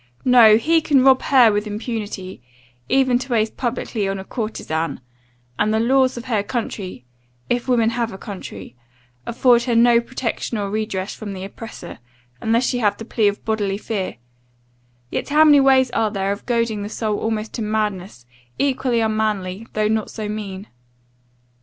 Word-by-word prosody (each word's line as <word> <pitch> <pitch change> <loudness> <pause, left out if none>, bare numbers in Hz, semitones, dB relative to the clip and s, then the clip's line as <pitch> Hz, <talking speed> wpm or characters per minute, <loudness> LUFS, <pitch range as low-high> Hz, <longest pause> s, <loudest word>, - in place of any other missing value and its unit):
No; 235 -4 +7
he 325 +7 +2
can 280 -4 +3
rob 265 -1 +5
her 250 -5 +5
with 205 +1 -1
impunity, 210 - -5 0.5
even 260 -2 +3
to 255 0 -7
waste 220 -1 0
publicly 235 -4 -2
on 195 0 -2
a 190 - -6
courtezan; 165 -9 -3 0.6
and 210 - +2
the 220 - +2
laws 260 +2 +2
of 240 - -7
her 225 -5 0
country 205 - -5 0.5
if 245 +1 0
women 230 -3 +2
have 235 -1 -2
a 190 - -8
country 130 - -9 0.5
afford 240 0 +3
her 240 -2 0
no 235 0 +5
protection 235 -1 -4
or 200 -1 -3
redress 210 -3 -3
from 205 -2 -7
the 190 -1 -7
oppressor, 215 - -9 0.4
unless 230 +3 +2
she 245 - 0
have 205 -3 +1
the 225 - -8
plea 220 -2 +1
of 205 0 -2
bodily 205 -3 -1
fear; 205 -3 -4 1.0
yet - - -3
how 300 +2 +5
many 295 -2 +7
ways 265 -2 +4
are 220 -1 +1
there 195 -1 -2
of 200 - -6
goading 230 -3 0
the 205 - -5
soul 215 -1 -2
almost 220 -1 -3
to 235 - -4
madness, 210 - -3 0.3
equally 260 -4 +1
unmanly, 215 -2 -1
though 215 0 +1
not 220 0 -1
so 215 -2 -5
mean? 205 -2 -5
220 Hz, 170 wpm, -21 LUFS, 205-245 Hz, 1.0 s, No